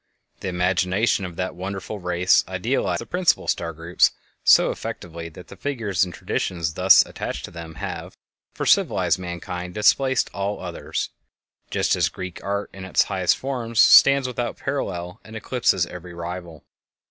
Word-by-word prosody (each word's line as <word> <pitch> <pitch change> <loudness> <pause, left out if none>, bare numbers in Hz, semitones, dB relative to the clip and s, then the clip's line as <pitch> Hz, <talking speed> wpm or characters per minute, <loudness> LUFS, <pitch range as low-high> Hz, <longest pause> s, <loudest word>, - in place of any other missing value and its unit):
The - - -5
imagination 90 +3 +1
of 90 -2 -7
that 95 +1 -3
wonderful 95 +3 -5
race 90 0 +3
idealized 95 -2 -1
the - - -7
principal 180 -1 +1
star 85 -1 -1
groups 85 +2 +2 0.3
so - - +6
effectively 85 -1 -6
that 85 +2 -13
the - - -10
figures 115 -11 -1
and 90 - -3
traditions 85 -1 -2
thus 90 +3 +6
attached - - -5
to - - -12
them 85 -1 -9
have, 95 +2 -6 0.3
for - - -4
civilized - - +3
mankind, 90 0 -6
displaced 130 +4 +3
all 100 +1 -2
others, 90 -2 -4 0.6
just - - +1
as - - +2
Greek 95 -2 -8
art 100 0 -3
in 95 - -9
its 95 - +3
highest 95 -3 +1
forms 120 -4 -3
stands 140 -1 +7
without 120 -1 -3
parallel 90 -10 -4
and 110 +2 -12
eclipses 110 -5 +1
every 90 0 -10
rival. 85 -1 -7
90 Hz, 155 wpm, -23 LUFS, 85-105 Hz, 0.6 s, stands